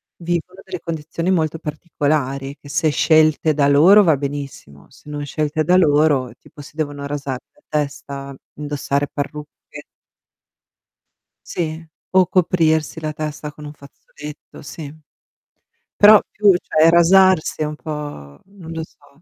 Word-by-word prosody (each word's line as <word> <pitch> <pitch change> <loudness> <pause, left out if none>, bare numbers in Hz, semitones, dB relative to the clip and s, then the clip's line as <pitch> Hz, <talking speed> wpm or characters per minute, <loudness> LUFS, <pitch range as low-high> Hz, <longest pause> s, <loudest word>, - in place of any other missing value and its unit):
vivono 175 +2 -4
delle 185 -2 -7
condizioni 165 +1 -4
molto 160 -3 0
particolari 145 -3 -2
che 145 - -15
se 155 +2 +1
scelte 155 0 +3
da 145 -1 +2
loro 165 +9 +7
va 160 -5 +4
benissimo, 140 - -7
se 135 +3 -17
non 145 -1 -5
scelte 155 +1 -2
da 180 +3 +4
loro 145 -6 +3
tipo 145 - -15
si 150 +2 -15
devono 145 -2 -3
rasare 140 -3 -4
la 295 - -28
testa, 140 -2 -4 0.2
indossare 145 -1 -2
parrucche. 150 +1 -7 1.6
Sì, 160 -1 -4 0.3
o 185 -1 +4
coprirsi 165 -3 +1
la 155 -1 -3
testa 150 -1 -6
con 150 0 -13
un 145 - -8
fazzoletto, 150 +1 -13
sì. 145 0 -9 1.0
Però, 210 0 +8
più 205 -1 +4
cioè, 160 -2 +3
rasarsi 170 -1 +4
è - - +1
un 150 0 -4
po' 145 - -8
non 190 -4 -12
lo 165 -1 -4
so. 145 -1 -19
150 Hz, 135 wpm, -19 LUFS, 145-165 Hz, 1.6 s, Però